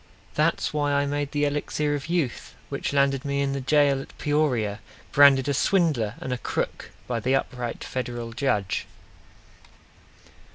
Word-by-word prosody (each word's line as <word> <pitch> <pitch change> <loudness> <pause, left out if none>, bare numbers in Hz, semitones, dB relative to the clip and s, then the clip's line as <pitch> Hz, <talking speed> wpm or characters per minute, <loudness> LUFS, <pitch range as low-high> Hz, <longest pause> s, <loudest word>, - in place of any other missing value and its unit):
That's - - +1
why 145 -1 +1
I 140 0 +2
made 145 0 -2
the 145 -1 +1
Elixir 145 +1 -1
of 145 0 -3
Youth, 165 -9 -2
Which - - -3
landed 140 -1 +2
me 140 -1 -1
in 135 0 -1
the 140 - -2
jail 140 0 +3
at - - -13
Peoria 125 -9 0 0.3
Branded 140 -2 +6
a 145 - +1
swindler 140 - +2
and 130 - -3
a 125 - -3
crook - - -3 0.2
By 120 -2 -2
the 130 +4 +1
upright 125 -3 -3
Federal 120 -2 -4
Judge! 115 -7 -1
140 Hz, 155 wpm, -25 LUFS, 125-145 Hz, 0.3 s, Branded